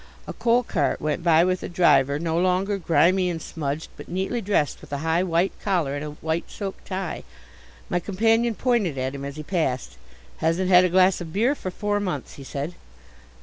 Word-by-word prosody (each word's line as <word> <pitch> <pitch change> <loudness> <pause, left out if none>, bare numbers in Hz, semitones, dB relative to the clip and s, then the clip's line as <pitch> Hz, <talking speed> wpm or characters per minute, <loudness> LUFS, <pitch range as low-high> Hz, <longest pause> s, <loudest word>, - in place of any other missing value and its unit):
A - - -6
coal 240 +1 +2
cart 160 -10 0
went 155 +2 -1
by 165 -1 +5
with 185 0 0
a - - -5
driver, 145 -5 +4
no 165 +1 -2
longer 185 +3 +1
grimy 175 +3 +3
and 170 -2 -3
smudged, 155 -1 -4
but - - -11
neatly 190 +7 -2
dressed 190 -8 0
with - - -14
a 140 - -1
high 160 +2 +2
white 180 +1 +1
collar 175 -9 0
and 145 - -4
a 150 - -4 0.2
white 160 +1 -1
silk 195 -2 -6
tie. 185 -2 -4 0.6
My 175 - 0
companion 225 +5 +1
pointed 220 - +1
at 130 +1 -2
him 140 0 -6
as 140 0 -5
he 155 - -6
passed. 130 - -2 0.4
"Hasn't 165 +3 0
had 180 0 +7
a - - +1
glass 185 +1 +4
of 165 -2 -6
beer 230 - +2
for 190 - -5
four 205 +2 -1
months," 180 -9 -4
he 140 - -10
said. 140 +5 -4
175 Hz, 200 wpm, -24 LUFS, 155-195 Hz, 0.6 s, had